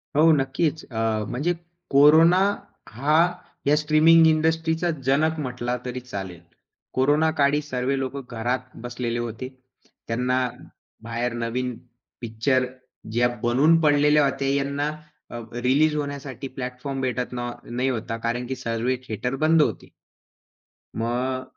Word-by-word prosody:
हो 160 +2 +6
नक्कीच, 145 +3 -1
अ, 110 -1 0
म्हणजे 145 +9 0 0.4
कोरोना 160 +6 +6 0.5
हा 140 +7 0 0.5
या 145 - +5
स्ट्रीमिंग 155 +2 +5
इंडस्ट्रीचा 160 +2 +1 0.2
जनक 155 +4 +2
म्हटला 125 -2 -3
तरी 125 0 -4
चालेल. 95 -8 -7 0.5
कोरोनाकाळी 145 +1 +2
सर्वे 135 -1 -2
लोक 135 +1 -3 0.2
घरात 125 +3 -3
बसलेले 120 -1 -3
होते. 120 +2 -5 0.6
त्यांना 125 +2 0 0.7
बाहेर 115 +1 -2
नवीन 125 +1 -2 0.4
पिक्चर 120 +3 +1 0.5
ज्या 120 +2 +3 0.2
बनून 140 +8 +4
पडलेल्या 150 0 +4
होत्या 135 0 -1
यांना 140 +1 -1 0.4
अ, - - -7 0.3
रिलीज 150 +5 +3
होण्यासाठी 140 -3 -5
प्लॅटफॉर्म 130 +1 -5
भेटत 125 -1 -2
ना 120 0 -3
नाही 125 +3 -1
होता 115 -2 -3
कारण 120 +1 -1
की 130 - -3
सर्वे 115 +1 -1
थिएटर 125 +3 -3
बंद 160 0 +5
होते. - - -2 1.1
मग, 125 +3 -1
130 Hz, 120 wpm, -24 LUFS, 120-150 Hz, 1.1 s, हो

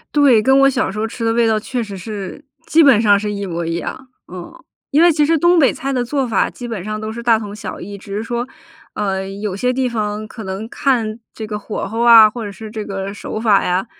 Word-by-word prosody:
对， 275 -7 +5
跟 265 +5 +4
我 275 0 +6
小 270 - 0
时 195 - -7
候 215 - 0
吃 230 +1 -5
的 225 - +2
味 235 0 +3
道 220 -1 +2
确 245 +3 -3
实 205 -3 -8
是， 195 +3 -7 0.3
基 325 - +5
本 270 -8 +6
上 205 -3 +4
是 210 0 -3
一 200 0 -4
模 170 -2 -4
一 165 0 -2
样， 260 +9 -6 0.2
嗯。 180 -2 -8 0.4
因 300 +4 +4
为 345 - +6
其 300 -1 +2
实 325 +2 +2
东 345 +3 +4
北 275 - +4
菜 275 - -4
的 250 -2 -1
做 275 +2 -1
法 225 -5 +1
基 245 -1 -8
本 220 -6 -4
上 215 +2 -5
都 215 0 -4
是 235 +1 -7
大 235 -1 +4
同 210 -2 -7
小 210 -1 -7
异， 200 +2 -8
只 200 0 -8
是 210 - -2
说， 240 +1 -3 0.5
呃， 195 -2 -2
有 200 0 -4
些 250 +6 0
地 255 0 0
方 215 -2 -3
可 220 0 -9
能 195 +4 -5
看 235 -5 0
这 220 - -6
个 210 -1 -5
火 210 - -5
候 225 +3 -5
啊， 230 -2 +8
或 230 0 -6
者 - - -5
是 215 +2 -10
这 215 -1 -5
个 195 0 -5
手 205 - -6
法 215 -3 +3
呀， 180 +2 0
220 Hz, 280 characters per minute, -18 LUFS, 200-245 Hz, 0.5 s, 啊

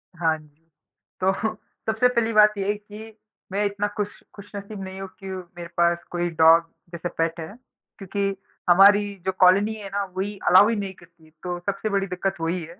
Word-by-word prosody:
हाँ 160 -2 +1
जी। 155 0 -21 0.6
तो 190 +1 +4
सबसे 220 +2 -1
पहली 235 -2 0
बात 210 0 +6
ये 195 -1 -2
है 205 - +2
कि 210 +1 -12 0.4
मैं 205 +2 0
इतना 205 0 -1
खुश 205 -1 -3 0.2
खुशनसीब 200 0 -8
नहीं 190 0 -8
हूँ 195 - -5 0.2
कि - - -6
मेरे 180 -2 -7
पास 170 0 +2
कोई 175 0 -1
डॉग 165 +1 +7 0.3
जैसे 170 +1 -4
पेट 165 +1 0
है, 160 - -6 0.5
क्योंकि 195 0 -2 0.3
हमारी 200 +3 +6
जो 190 - +1
कॉलोनी 195 +4 +5
है 205 -2 -8
ना 200 0 0
वही 200 +2 -3
अलाउ 190 +4 +7
ही 230 - +1
नहीं 200 -2 -4
करती, 170 -3 -21
तो 175 -1 -3
सबसे 200 +4 -3
बड़ी 200 -1 0
दिक्कत 190 +1 -2
वही 170 +2 -1
है। 170 +3 -11
195 Hz, 190 wpm, -24 LUFS, 175-205 Hz, 0.6 s, डॉग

